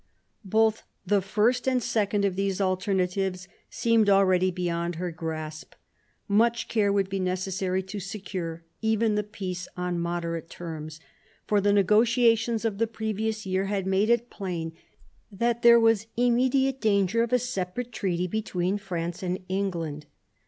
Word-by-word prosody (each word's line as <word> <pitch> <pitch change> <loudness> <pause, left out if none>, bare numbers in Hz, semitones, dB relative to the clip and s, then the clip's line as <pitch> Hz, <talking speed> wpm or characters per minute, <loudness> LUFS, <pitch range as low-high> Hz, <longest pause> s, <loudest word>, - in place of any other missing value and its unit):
Both 220 +2 +2 0.2
the 205 -1 +2
first 225 +6 +1
and 260 -1 +3
second 205 -2 +1
of 190 -2 0
these 195 0 -1
alternatives 185 -1 0 0.2
seemed 230 -3 +2
already 185 -2 +4
beyond 175 -1 -2
her 175 +1 -3
grasp. 155 -1 -6 0.5
Much 230 +3 +2
care 205 -3 +2
would 200 -1 +1
be 195 0 -3
necessary 185 0 -1
to 195 +2 -6
secure 180 -4 -5 0.2
even 220 0 +2
the 210 - +1
peace 185 -4 -6
on 180 -1 -2
moderate 170 -1 -3
terms; 155 -3 -7 0.5
for 205 -1 +2
the 205 +1 +3
negotiations 225 +3 +3
of 210 -3 -1
the 230 - +2
previous 220 0 -3
year 190 +1 0
had 195 -1 -2
made 195 +3 +2
it 235 0 +2
plain 170 -5 -4 0.6
that 235 +4 0
there 235 0 +8
was 225 -2 +3
immediate 260 +2 +2
danger 200 0 +2
of 235 - -1
a 250 - +5
separate 245 0 -4
treaty 180 -5 -1
between 190 -1 -1
France 175 -3 -4
and 180 -1 -1
England. 170 -6 -3
195 Hz, 145 wpm, -27 LUFS, 180-220 Hz, 0.6 s, there